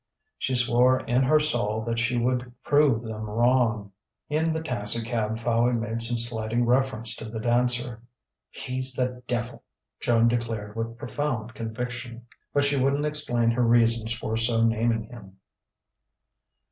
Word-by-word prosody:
She 130 - -1
swore 125 +1 +3
in 125 +2 +1
her 150 +4 +4
soul 115 -8 -1
that 115 0 -2
she 120 +1 0
would 125 +1 -1
prove 145 -6 +3
them 110 -1 -6
wrong. 115 -2 +1 0.4
In 160 +2 +1
the 160 0 -3
taxicab 115 -3 -2
Fowey 120 +1 +1
made 115 0 -2
some 120 +1 +2
slighting 115 0 +1
reference 125 -2 +2
to - - -6
the 110 0 -5
dancer. 120 0 0 0.5
"He's 130 +1 -1
the 125 -1 -2
devil!" 120 0 -3 0.4
Joan 115 -1 +3
declared 115 -3 -2
with 115 0 -4
profound 120 -4 -3
conviction. 120 +1 -6 0.3
But 145 - +2
she 140 0 +1
wouldn't 140 +3 +1
explain 120 -6 +1
her 120 +2 0
reasons 115 -1 +3
for 115 -1 -3
so 115 0 +2
naming 115 0 +1
him. 105 -5 -13
120 Hz, 145 wpm, -26 LUFS, 115-125 Hz, 0.5 s, her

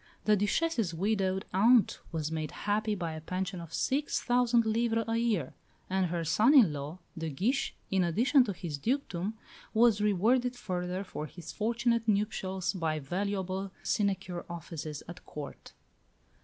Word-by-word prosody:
The 215 - +5
Duchesse's 205 - 0
widowed 190 0 0
aunt 225 +4 +5
was 160 -2 -2
made 155 -1 -2 0.2
happy 210 +1 +1
by 170 -4 -3
a 155 - -6
pension 185 +2 -3
of 165 -2 -10
six 280 - 0
thousand 240 -1 +3
livres 225 0 +1
a 225 0 +1
year; 215 - 0 0.4
and 190 -1 +2
her 170 0 -2
son 215 - +4
in 215 - +7
law, 145 +4 -5 0.2
de 160 -1 -3
Guiche, 220 - 0 0.2
in 190 -1 +3
addition 245 - +4
to 210 - -2
his 165 -5 -5
dukedom, 220 - -1 0.4
was 225 -2 +5
rewarded 235 +5 +2
further 180 -4 -3
for 155 -5 -6
his 175 +1 -9
fortunate 235 +1 0
nuptials 195 -3 0
by 165 -4 -1
valuable 190 +4 -2
sinecure 190 -4 -1
offices 160 -3 -6
at 175 +1 -9
Court. 145 -2 -8
195 Hz, 150 wpm, -30 LUFS, 170-225 Hz, 0.4 s, in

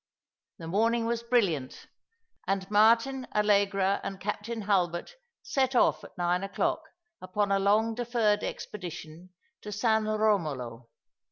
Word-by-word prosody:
The 165 - -8
morning 225 +6 +1
was 235 0 -1
brilliant, 195 - 0 0.6
and 195 0 -2
Martin, 230 +5 +3
Allegra, 200 -2 +2
and 195 - -5
Captain 210 +3 -4
Hulbert 185 - 0 0.3
set 265 -1 0
oflf 245 - +3
at - - -14
nine 175 +1 0
o'clock 195 0 -1 0.4
upon 200 +2 -1
a 195 - +3
long 215 +3 +2
deferred 230 -3 +1
expedition 175 -2 -7 0.3
to 210 - -7
San 220 +1 +1
Eomolo. 155 - -1
205 Hz, 120 wpm, -28 LUFS, 185-225 Hz, 0.6 s, Martin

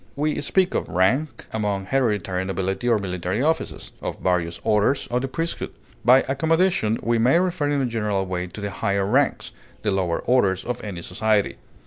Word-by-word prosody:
We 150 +1 0
speak 185 +5 +2
of - - -1
rank 125 - +1
among 105 -3 -1
hereditary 105 -7 0
nobility 95 +4 -2
or 115 - +4
military 95 +3 -2
officers; 160 +2 -1
of - - -4
various 85 -2 0
orders 110 +5 +2
of 125 +1 +1
the 135 - -2
priesthood; 165 +6 -3 0.3
by 130 +2 +6
accommodation, 160 - +2
we 115 0 +2
may 125 +8 +4
refer 175 -5 0
in 145 -1 +1
a - - +1
general 105 -5 -1
way 90 -1 -3
to 90 +4 -9
the 100 -1 -3
higher 100 +1 0
ranks, 130 +7 +1 0.3
the 105 - +1
lower 90 -3 0
orders 100 -7 +2
of 125 0 -4
any 95 -5 -6
society. 105 +3 0
110 Hz, 175 wpm, -23 LUFS, 95-135 Hz, 0.3 s, by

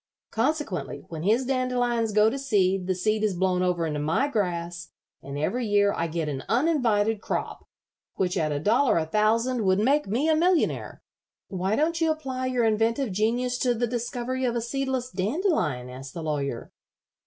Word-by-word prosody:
Consequently, 260 - -2
when 160 -2 -6
his 225 +8 +2
dandelions 245 -3 0
go 210 +1 +4
to 270 +5 -1
seed 195 -8 +1
the 185 - +1
seed 215 +4 0
is 210 -3 +1
blown 180 0 +1
over 180 -2 +1
into 150 -2 -2
my 160 - +1
grass, 175 - -3 0.3
and 140 +1 -7
every 225 +11 -1
year 205 -1 +3
I 165 - -1
get 165 -1 -3
an 135 -3 -3
uninvited 230 -7 +2
crop, - - -4 0.5
which 185 0 0
at 155 -4 0
a 145 - -1
dollar 220 - +3
a 160 - +1
thousand 225 +6 +1
would 190 -1 +3
make 275 +7 +2
me 240 +10 0
a 320 - +4
millionaire." 345 +1 +1 0.5
"Why 190 +2 -1
don't 330 +4 0
you 325 - +3
apply 265 -5 -2
your 250 -2 +1
inventive 225 +3 +1
genius 240 +5 0
to 245 -2 +2
the 240 +2 0
discovery 245 +2 -3
of 240 -2 0
a 235 - 0
seedless 260 +1 -2
dandelion?" 195 - 0
asked 130 +1 -9
the 165 - -5
Lawyer. 140 -6 -3
220 Hz, 175 wpm, -26 LUFS, 180-255 Hz, 0.5 s, go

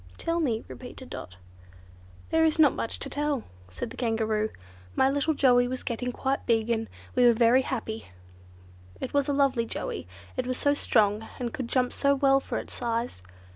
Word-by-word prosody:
"Tell 335 0 -1
me," 235 -8 0
repeated 255 +1 -10
Dot. 95 +1 -7 0.9
"There 320 0 +4
is 315 -1 +3
not 305 -3 +6
much 230 - -2
to - - -5
tell," 285 -2 -1 0.3
said 90 -2 -5
the - - -10
Kangaroo. 220 -2 0 0.5
"My 265 - +4
little 285 +2 +1
Joey 245 -3 +5
was 255 +1 -4
getting 245 +1 -2
quite 265 +2 -1
big, 225 0 +2
and 225 -1 0 0.3
we 250 - +3
were 240 - +7
very 235 +3 +5
happy. 225 -4 -4 0.9
It 260 - -5
was 285 0 +2
a - - +3
lovely 270 -4 +2
Joey. 85 - -4 0.3
It - - -1
was 255 0 -1
so 285 - +3
strong, 215 -5 +2
and 240 -2 -3
could 255 - -3
jump 250 0 +1
so 280 0 +3
well 270 0 +4
for - - -4
its - - -6
size. 235 - -2
250 Hz, 185 wpm, -27 LUFS, 225-275 Hz, 0.9 s, were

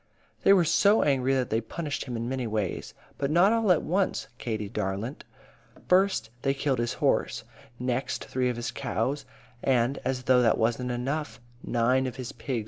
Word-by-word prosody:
"They - - +5
were 185 -4 +6
so 200 +6 +4
angry 135 -2 +2
that 130 -2 -1
they 110 +1 +1
punished 145 +6 -4
him 125 -3 -4
in 115 +1 -3
many 130 -1 -2
ways. 105 -4 -3 0.2
But 140 - 0
not 175 +7 +5
all 225 -4 +3
at 175 - +3
once, 185 -5 0
Katie 110 -3 -3
darlint. 105 +5 -4 0.6
First, 185 - +3
they 135 0 +1
killed 135 -3 0
his 120 0 0
horse; - - 0 0.3
next, 125 +1 -2
three 125 -1 0
of 125 - -2
his 120 0 -3
cows; 135 +6 -2 0.4
and, 130 0 +2
as 130 -1 -2
though 125 0 +4
that 115 - +3
wasn't 120 +3 0
enough, 135 +5 -3 0.2
nine 125 +3 +2
of 125 - -5
his 130 0 -6
pigs - - -18
died. - - 0
130 Hz, 185 wpm, -27 LUFS, 120-145 Hz, 0.6 s, were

